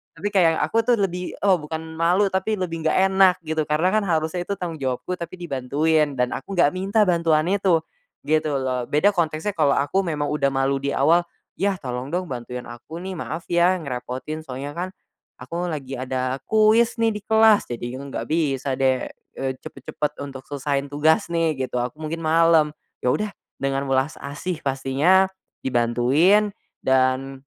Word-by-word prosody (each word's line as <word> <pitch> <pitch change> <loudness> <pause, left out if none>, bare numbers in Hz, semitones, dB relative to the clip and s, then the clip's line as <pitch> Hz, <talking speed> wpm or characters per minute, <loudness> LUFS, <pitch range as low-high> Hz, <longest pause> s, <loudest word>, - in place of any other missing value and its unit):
Tapi 200 +5 -3
kayak 170 -5 +4
aku 225 - +1
tuh 245 - +5
lebih 180 -4 -2
oh, 190 -3 +4
bukan 160 +1 -5 0.2
malu 185 +4 +3
tapi 190 +3 0
lebih 165 -4 -3
gak - - +2 0.2
enak 190 -1 +5
gitu 155 -1 -2
karena 160 +5 +2
kan 215 +1 +2
harusnya 165 +1 -1
itu 200 - -1
tanggung 170 -4 -5
jawabku 130 +6 -2
tapi 170 +1 -6
dibantuin 150 -1 0
dan 125 -1 0
aku 195 +9 -5
gak 170 -5 +4
minta 195 +4 +1
bantuan 165 -4 +2
itu, 185 -5 +2 0.4
gitu 155 -1 +1
loh. 130 -2 -1
Beda 170 +8 +3
konteksnya 170 +1 -1
kalau 150 -7 +2
aku 145 +7 +1
memang 150 -3 -2
udah 150 -2 +1
malu 135 +1 +1
di 140 +1 -2
awal, 165 +5 +4 0.4
"Yah 200 +1 +1
tolong 125 -2 -4
dong 180 -3 -2
bantuin 125 0 -5
aku 120 +8 -9
nih, 190 0 -5
maaf 165 +2 -5
ya 175 +2 +4
ngerepotin 130 +3 -5
soalnya 135 +3 -5
kan 180 +2 -2 0.5
aku 170 +8 -4
lagi 135 -5 -5
ada 130 0 -2
kuis 220 +2 +4
nih 225 -1 +3
di - - -3
kelas 220 -1 +5
jadinya 120 +2 -5
gak - - -5
bisa 140 -4 0
deh, 130 -1 +2 0.3
eee, 135 0 -1
cepat-cepat 140 +2 -5
untuk 135 -2 -9
selesaiin 140 0 -2
tugas 155 +2 +2
nih," 160 -5 0
gitu, - - -8
"aku 125 +5 -4
mungkin 160 +1 -4
malam." 160 -1 +4 0.3
Ya 125 - +3
udah 210 +6 -1 0.3
dengan 135 0 -1
welas 135 +3 +1
asih 150 +5 -4
pastinya 140 +8 +3 0.4
dibantuin 130 - +3 0.3
dan 130 +1 +1
155 Hz, 170 wpm, -23 LUFS, 135-180 Hz, 0.5 s, tuh